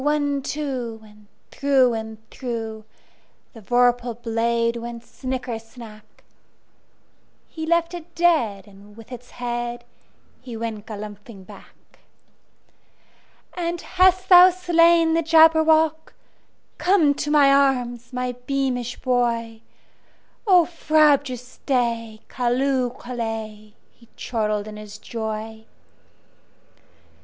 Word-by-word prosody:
One, 290 Hz, -1 st, 0 dB
two! 260 Hz, -6 st, -4 dB
And 210 Hz, -1 st, -19 dB, 0.2 s
through 270 Hz, -3 st, +2 dB
and 220 Hz, -1 st, -5 dB
throughThe 225 Hz, -4 st, -5 dB, 0.7 s
vorpal 245 Hz, +2 st, +1 dB
blade 230 Hz, 0 st, 0 dB
went 235 Hz, 0 st, -7 dB
snicker 245 Hz, -1 st, -5 dB
snack! 225 Hz, -2 st, -15 dB, 1.2 s
He 320 Hz, -1 st, -7 dB
left 335 Hz, +1 st, +1 dB
it 345 Hz, 0 st, -10 dB
dead, 245 Hz, -, +1 dB
and 205 Hz, +1 st, -17 dB
with 230 Hz, +2 st, -14 dB
its 245 Hz, 0 st, -11 dB
headHe 240 Hz, 0 st, -4 dB, 0.7 s
went 220 Hz, -2 st, -5 dB
galumphing 210 Hz, -1 st, -9 dB
back."And 345 Hz, -, -12 dB
hast 370 Hz, 0 st, +2 dB
thou 360 Hz, 0 st, +9 dB
slain 340 Hz, -2 st, +3 dB
the 330 Hz, -, +2 dB
Jabberwock? 320 Hz, -1 st, +4 dB, 0.6 s
Come 350 Hz, -6 st, +3 dB
to 295 Hz, -, -4 dB
my 285 Hz, -2 st, +5 dB
arms, 245 Hz, -4 st, +1 dB
my 250 Hz, 0 st, -2 dB, 0.2 s
beamish 255 Hz, -3 st, -2 dB
boy!O 240 Hz, -, -1 dB
frabjous 285 Hz, -7 st, +1 dB
day! 230 Hz, -4 st, -1 dB
Callooh! 255 Hz, 0 st, -1 dB
Callay!"He 225 Hz, -2 st, -8 dB
chortled 215 Hz, -3 st, -2 dB
in 210 Hz, 0 st, -9 dB
his 210 Hz, 0 st, -10 dB
joy. 220 Hz, 0 st, -6 dB
245 Hz, 95 wpm, -22 LUFS, 225-300 Hz, 1.2 s, thou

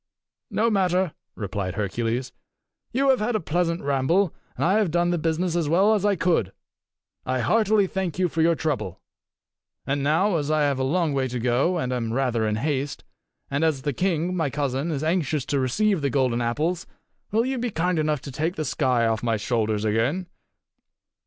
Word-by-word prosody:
"No 230 Hz, +2 st, +1 dB
matter," 185 Hz, -3 st, +1 dB, 0.2 s
replied 100 Hz, -3 st, -3 dB
Hercules. 115 Hz, +5 st, -2 dB, 0.6 s
"You 270 Hz, +3 st, +2 dB
have 265 Hz, -, +4 dB
had 220 Hz, +2 st, 0 dB
a -, -, +2 dB
pleasant 170 Hz, 0 st, -1 dB
ramble, 145 Hz, +7 st, +2 dB, 0.2 s
and -, -, -1 dB
have 200 Hz, +1 st, +3 dB
done 175 Hz, +2 st, +1 dB
the 175 Hz, -, 0 dB
business 165 Hz, +2 st, 0 dB
as 165 Hz, -4 st, 0 dB
well 195 Hz, +7 st, +4 dB
as 205 Hz, -3 st, +1 dB
I 205 Hz, -1 st, +3 dB
could. 165 Hz, -, +1 dB, 0.7 s
I 130 Hz, 0 st, -1 dB
heartily 215 Hz, -, +3 dB
thank 190 Hz, -3 st, -3 dB
you 185 Hz, -1 st, +2 dB
for 165 Hz, -1 st, -1 dB
your 165 Hz, +1 st, +4 dB
trouble. 130 Hz, -, -2 dB, 0.9 s
And 140 Hz, +1 st, -1 dB
now, 165 Hz, +7 st, +2 dB
as 145 Hz, -1 st, -2 dB
I 155 Hz, 0 st, +2 dB
have 140 Hz, -2 st, +1 dB
a -, -, +1 dB
long 160 Hz, +2 st, +1 dB
way 135 Hz, -1 st, 0 dB
to 125 Hz, 0 st, -4 dB
go, 125 Hz, +9 st, +1 dB
and 130 Hz, -6 st, -1 dB
am 115 Hz, -2 st, -2 dB
rather 120 Hz, -4 st, +1 dB
in 105 Hz, -, 0 dB
haste, 140 Hz, +3 st, -2 dB, 0.5 s
and 140 Hz, +3 st, 0 dB
as 150 Hz, -5 st, +1 dB
the 145 Hz, -1 st, -1 dB
king, 180 Hz, +2 st, 0 dB
my 160 Hz, -5 st, 0 dB
cousin, 140 Hz, +2 st, -1 dB
is 150 Hz, -2 st, -2 dB
anxious 155 Hz, -4 st, 0 dB
to 140 Hz, -, 0 dB
receive 190 Hz, -, +1 dB
the 140 Hz, -, +1 dB
golden 130 Hz, -3 st, +1 dB
apples, 155 Hz, +9 st, -1 dB, 0.4 s
will 225 Hz, +3 st, +2 dB
you 260 Hz, -1 st, -1 dB
be 245 Hz, 0 st, -1 dB
kind 180 Hz, -2 st, 0 dB
enough 150 Hz, -2 st, 0 dB
to 140 Hz, -, -8 dB
take 160 Hz, +7 st, -2 dB
the 155 Hz, -, -3 dB
sky 130 Hz, -4 st, +1 dB
off 110 Hz, -1 st, 0 dB
my 115 Hz, -2 st, 0 dB
shoulders 110 Hz, -1 st, -1 dB
again?" 120 Hz, -, +1 dB
155 Hz, 190 wpm, -24 LUFS, 130-180 Hz, 0.9 s, have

